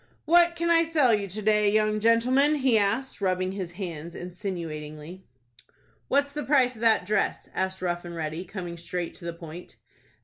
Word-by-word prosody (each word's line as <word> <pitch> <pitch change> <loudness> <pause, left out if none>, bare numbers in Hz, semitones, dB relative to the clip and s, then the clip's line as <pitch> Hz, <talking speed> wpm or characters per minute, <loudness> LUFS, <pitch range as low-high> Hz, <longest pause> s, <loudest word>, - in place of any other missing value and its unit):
"What 340 +2 +5
can 340 0 0
I 330 0 +5
sell 305 -7 +3
you 205 -2 0
to 205 +3 -4
day, 210 0 +3
young 215 0 +2
gentleman?" 250 +7 +3
he 265 -5 +2
asked, 220 +4 0
rubbing 185 -1 0
his 185 -3 -5
hands 170 -3 -6
insinuatingly. 170 -2 -6 0.8
"What's 280 +1 +1
the 295 - -3
price 260 -4 +3
of 225 - -13
that 225 -5 +3
dress?" 210 +1 -1
asked 190 0 -2
Rough 175 -1 -1
and 170 -1 -8
Ready, 160 +1 -4
coming 180 -2 -7
straight 170 0 -4
to 175 - -11
the 170 - -2
point. 170 +1 -10
200 Hz, 175 wpm, -26 LUFS, 175-250 Hz, 0.8 s, What